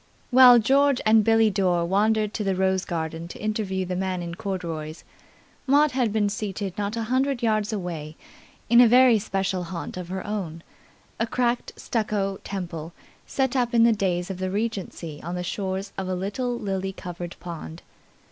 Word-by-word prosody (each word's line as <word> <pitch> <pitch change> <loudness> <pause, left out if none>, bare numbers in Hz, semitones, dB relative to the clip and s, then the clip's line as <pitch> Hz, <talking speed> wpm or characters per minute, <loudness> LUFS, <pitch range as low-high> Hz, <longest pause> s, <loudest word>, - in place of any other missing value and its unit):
While 250 -1 +9
George 275 +4 +3
and 215 0 +5
Billie 225 0 +4
Dore 180 -4 +1
wandered 210 +3 +1
to 215 - -2
the 195 -2 0
rose 190 0 +1
garden 165 -1 -4
to - - -10
interview 205 -3 -2
the 180 0 -3
man 185 -1 -2
in 170 0 -5
corduroys, 170 -4 -5 0.6
Maud 290 +2 +4
had 250 -4 0
been 210 -1 +1
seated 200 -2 -4
not 205 +2 -3
a 230 - -1
hundred 260 +2 0
yards 215 -1 +1
away 170 -7 -5 0.5
in 235 +1 +7
a 245 - +7
very 245 -1 +6
special 190 -2 -2
haunt 170 +1 -6
of 180 -1 -6
her 190 +1 -4
own, 175 -6 -4 0.6
a 230 - +1
cracked 240 0 -1
stucco 205 -4 -2
temple 170 -4 -5 0.3
set 265 -1 0
up 240 -2 +1
in 230 - +6
the 230 0 +5
days 185 -3 -1
of 185 - -6
the 185 0 -2
Regency 195 -7 -4
on 175 +2 -5
the 180 - -3
shores 190 +1 -3
of 190 - -3
a 185 - -1
little 235 +7 -2
lily 195 -3 -3
covered 175 -1 -7
pond. 170 -1 -8
195 Hz, 175 wpm, -25 LUFS, 180-225 Hz, 0.6 s, While